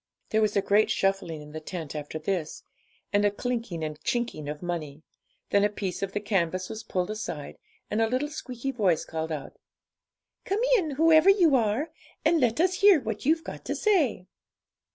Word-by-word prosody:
There 220 - +3
was 210 -1 +1
a 200 - +2
great 210 +2 +3
shuffling 195 -6 0
in 150 - -12
the 155 - -5
tent 160 -2 -6
after 150 +1 -5
this, 160 0 -3 0.5
and 205 0 +3
a 205 - +5
clinking 225 -5 -3
and 155 0 -5
chinking 235 -12 -2
of 150 +3 -6
money; 155 -4 -4 0.5
then 200 - +4
a 205 - +4
piece 195 -3 -4
of 195 0 -3
the 205 - 0
canvas 185 -3 -1
was 220 0 -5
pulled 180 +2 -2
aside, 175 -9 -6 0.3
and 215 - +1
a 225 - +3
little 260 +5 0
squeaky 265 -3 -5
voice 195 -10 +1
called 160 0 -4
out 150 -3 -6 0.9
'Come 405 +3 -1
in, 360 -9 +1
whoever 320 +4 +6
you 360 -7 +5
are, 245 +6 +1 0.3
and 335 - +4
let 240 +2 +2
us 370 +2 +2
hear 400 -5 +7
what 225 0 -4
you've 325 +1 +3
got - - -8
to - - -2
say.' 320 - +2
205 Hz, 190 wpm, -27 LUFS, 170-265 Hz, 0.9 s, hear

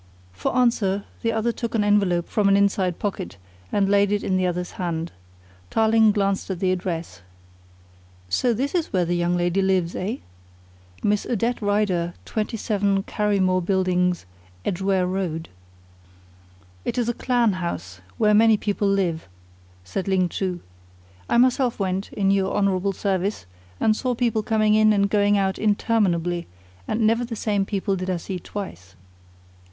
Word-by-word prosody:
For 100 - -2
answer 205 -5 +2 0.2
the 230 - +1
other 225 +1 0
took 235 0 -4
an 215 - +2
envelope 200 -4 +2
from 205 -2 +2
an 195 - +5
inside 195 -3 +1
pocket 195 -3 -4 0.3
and 200 -1 +2
laid 200 0 +3
it 205 0 0
in 190 - 0
the 185 0 +2
other's 180 0 -3
hand. 170 -1 -2 0.6
Tarling 220 -1 +4
glanced 200 -2 0
at 185 -3 -3
the 185 -1 +1
address. 170 - -4 1.1
"So 165 - +1
this 265 +5 -1
is 345 -3 -1
where 180 -2 +1
the 175 - -1
young 175 0 +1
lady 175 +2 +1
lives, 185 -3 +1
eh? 205 +6 -2 0.9
Miss 210 0 +1
Odette 235 +1 -1
Rider, 205 -5 0
27, 205 -2 -1
Carrymore 195 -4 +1
Buildings, 180 - +1 0.4
Edgware 190 0 +1
Road." 180 -3 -3 1.3
"It - - -3
is 240 -2 +1
a 240 - +1
clan 240 -3 +1
house, 90 - -5 0.2
where 210 -1 +3
many 220 0 +5
people 205 0 -1
live," 185 - 0 0.6
said 180 - -4
Ling 185 -2 +2
Chu. 180 -2 -3 0.7
"I - - +3
myself 250 0 +3
went, 190 0 -2
in 195 -1 +1
your 195 -1 +1
honourable 195 0 +1
service, 195 - -1 0.3
and 215 - +3
saw 250 +1 -1
people 230 -2 +1
coming 215 0 +2
in 215 0 +5
and 200 -1 +1
going 205 -1 +3
out 190 -1 0
interminably, 190 -5 +1 0.4
and 220 - -1
never 225 +2 +3
the 235 -1 -5
same 205 -2 0
people 195 0 -1
did 185 0 -4
I 185 - 0
see 180 +2 -5
twice." 95 - -8
195 Hz, 155 wpm, -23 LUFS, 180-215 Hz, 1.3 s, an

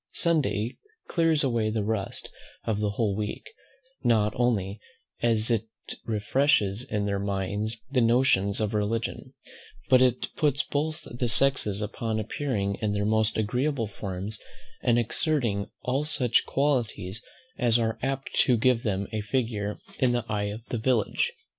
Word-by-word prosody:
Sunday 140 - +1 0.3
clears 165 -3 +2
away 120 -5 +1
the 110 -1 -1
rust 105 -2 -3 0.3
of 110 -2 -1
the 105 -1 +1
whole 100 -1 0
week, 105 - -4 0.5
not 110 -4 +3
only 105 -5 0 0.4
as 115 -1 +2
it 115 -1 +1 0.4
refreshes 110 -1 +2
in 105 -6 -2
their 100 -1 0
minds 100 +3 -2
the 130 -3 +3
notions 115 -4 +3
of 110 0 -1
religion, 110 +2 -2 0.6
but 130 -1 +7
as 130 -2 +5
it 125 - -8
puts 140 -2 +2
both 155 +3 -2
the 120 0 -1
sexes 105 -4 +4
upon 110 +1 -2
appearing 105 -3 -2
in 105 -2 0
their 105 0 0
most 110 0 +2
agreeable 125 +4 0
forms, 100 +1 -4 0.4
and 120 -1 +3
exerting 120 -3 0
all 130 +3 0
such 130 -6 +1
qualities 120 -7 0 0.4
as 120 -2 +4
are 110 -1 -1
apt 135 +1 -3
to 125 -3 +4
give 120 +1 +3
them 100 -3 -1
a 110 - -1
figure 105 -3 -1 0.2
in 125 -2 +3
the 120 -2 -1
eye 105 -2 -1
of 105 +3 -5
the 120 - -2
village. 115 -1 +1
110 Hz, 150 wpm, -27 LUFS, 105-125 Hz, 0.6 s, but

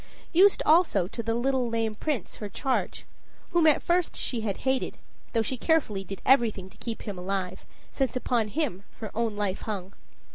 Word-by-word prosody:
Used 385 +4 +6
also 310 - +4
to 230 - -4
the 225 0 -1
little 255 0 +1
lame 225 -1 0
Prince, 250 - -3
her 210 - -5
charge 260 +6 -2 0.5
whom 340 -3 +4
at 305 - +4
first 350 0 +1
she 240 -3 -1
had 205 -3 -2
hated, 265 -1 0 0.4
though 225 -2 +2
she 260 +4 -2
carefully 240 - +1
did 195 0 -8
everything 220 -8 +3
to - - -19
keep 230 -2 -5
him 200 -5 -5
alive, 185 0 -3 0.2
since 265 -4 -1
upon 240 -3 +1
him 245 - -2 0.2
her 220 - -5
own 225 -2 0
life 200 -2 -1
hung. 195 -3 -5
230 Hz, 180 wpm, -27 LUFS, 205-270 Hz, 0.5 s, Used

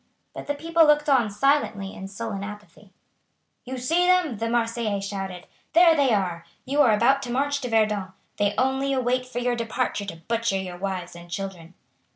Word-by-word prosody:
But - - -8
the 290 - -1
people 330 +2 +3
looked 295 0 +4
on 250 -6 +4
silently 210 -4 0
in 190 - -8
sullen 200 0 -5
apathy. 205 -1 -10 0.7
"You 260 +1 -5
see 330 +9 +1
them," 360 - +3
the 230 0 -1
Marseillais 230 -3 0
shouted. 195 -2 -5 0.3
"There 335 -1 +7
they 280 -4 +3
are. 180 -5 0 0.2
You 280 +3 +2
are 240 - +5
about 240 +6 +3
to 245 -3 -5
march 285 +3 0
to 250 - -4
Verdun. 210 -4 +1 0.3
They 205 0 +1
only 265 +1 +1
wait 255 0 0
for 255 - -8
your 245 0 0
departure 230 -2 -2
to 170 - -6
butcher 230 -3 0
your 185 -2 -5
wives 185 -2 -4
and 175 0 -12
children." 180 -2 -6
230 Hz, 185 wpm, -25 LUFS, 195-270 Hz, 0.7 s, There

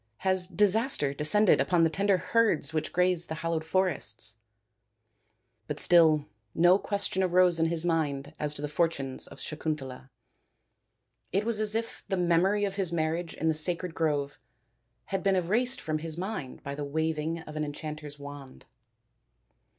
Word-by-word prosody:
Has 185 -1 +2
disaster 205 - +2
descended 165 +8 +4
upon 175 -2 +2
the 165 - +4
tender 195 +2 +2
herds 180 -8 +1
which 155 -1 -2
graze 180 -1 +1
in - - -19
the 160 - -4
hallowed 165 0 -2
forests? 160 - -2 0.7
" 110 +1 -47
But 150 -1 -4
still 160 -4 +5 0.3
no 175 +3 +5
question 200 -2 -1
arose 180 -2 +4
in 165 - +3
his 165 0 -1
mind 150 -4 -1
as 150 0 -1
to 145 - -7
the - - -1
fortunes 150 -4 -1
of - - -12
Sakuntala. 140 -4 -5 1.2
It 200 +3 0
was 230 -2 0
as 215 0 +1
if 230 0 -3
the 190 - -1
memory 180 +4 +2
of 195 0 -4
his 190 -4 0
marriage 165 +1 -2
in 160 - -2
the 160 - +3
sacred 170 +2 -2
grove 145 -3 -1 0.7
had 195 - 0
been 195 -1 +2
erased 220 +9 +1
from 155 -1 -2
his 160 0 -5
mind 185 -8 -5
by 140 - -5
the 145 +1 -5
waving 160 +2 -2
of 155 -1 -10
an 155 - -1
enchanter's 150 0 -6
wand. 140 -2 -10
165 Hz, 165 wpm, -28 LUFS, 150-185 Hz, 1.2 s, still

